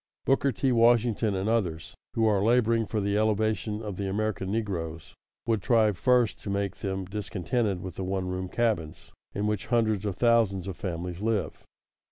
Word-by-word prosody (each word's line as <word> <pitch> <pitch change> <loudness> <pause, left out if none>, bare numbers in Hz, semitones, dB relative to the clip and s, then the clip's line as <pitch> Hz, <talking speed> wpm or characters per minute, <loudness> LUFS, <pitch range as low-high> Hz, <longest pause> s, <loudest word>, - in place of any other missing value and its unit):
Booker 135 +1 +3
T. 130 +2 0
Washington, 115 -3 +3
and 95 +2 -2
others 90 -8 -1 0.2
who 115 - +2
are 100 -3 +3
laboring 115 -1 +3
for 110 - -1
the 100 0 0
elevation 110 0 0
of 105 -4 -5
the 100 -1 -2
American 100 -1 -2
negroes, 85 -7 -3 0.3
would 115 -3 +1
try 110 0 +3
first 120 +2 +2
to - - -6
make 100 0 -2
them 95 -1 -3
discontented 100 0 -2
with 90 -2 -7
the 95 - -3
one 95 0 -2
room 90 0 -3
cabins, 105 -10 -2 0.2
in 100 - -1
which 105 -2 -1
hundreds 110 -4 +1
of 100 -3 -2
thousands 110 -5 +2
of 95 - -4
families 90 0 -5
live. 105 -7 -1
105 Hz, 175 wpm, -27 LUFS, 95-115 Hz, 0.3 s, Booker